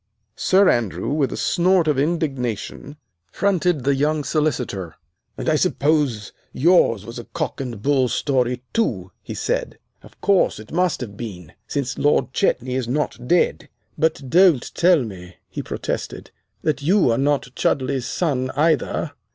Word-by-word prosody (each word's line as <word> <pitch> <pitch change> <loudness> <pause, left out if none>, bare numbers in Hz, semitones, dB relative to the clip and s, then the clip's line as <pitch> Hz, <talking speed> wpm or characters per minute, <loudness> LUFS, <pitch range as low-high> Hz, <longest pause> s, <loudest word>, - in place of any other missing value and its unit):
Sir 195 +1 +4
Andrew, 115 -5 0
with 145 -3 +1
a - - -4
snort 180 -2 +2
of 145 -3 +2
indignation, 140 - -2 0.3
fronted 180 -7 +1
the 140 +2 +2
young 150 +2 0
Solicitor. 120 - -2 0.4
"And - - -5
I 160 - +3
suppose 145 - +1 0.2
yours 130 - +3
was 115 +1 -7
a 120 - -8
cock 155 -3 -4
and 120 -6 -6
bull 135 -2 +3
story, 125 -1 0
too," 95 - -1
he - - -7
said. - - -2 0.2
"Of - - -18
course, 200 -2 +2
it 110 - -12
must 175 -3 0
have 105 -5 -6
been, 90 -8 -8
since 135 -4 -3
Lord 140 -3 +2
Chetney 125 0 0
is 130 -2 -1
not 125 -2 -2
dead. 175 +4 +1 0.3
But 155 -4 0
don't 170 -3 +4
tell 175 -5 +4
me," 95 -5 -9
he - - -5
protested, - - -5 0.3
"that 155 -2 0
you 175 - +3
are 115 - +1
not 140 -2 0
Chudleigh's 130 -1 0
son 130 -7 -1
either." 155 -1 +1
140 Hz, 150 wpm, -21 LUFS, 120-160 Hz, 0.4 s, Sir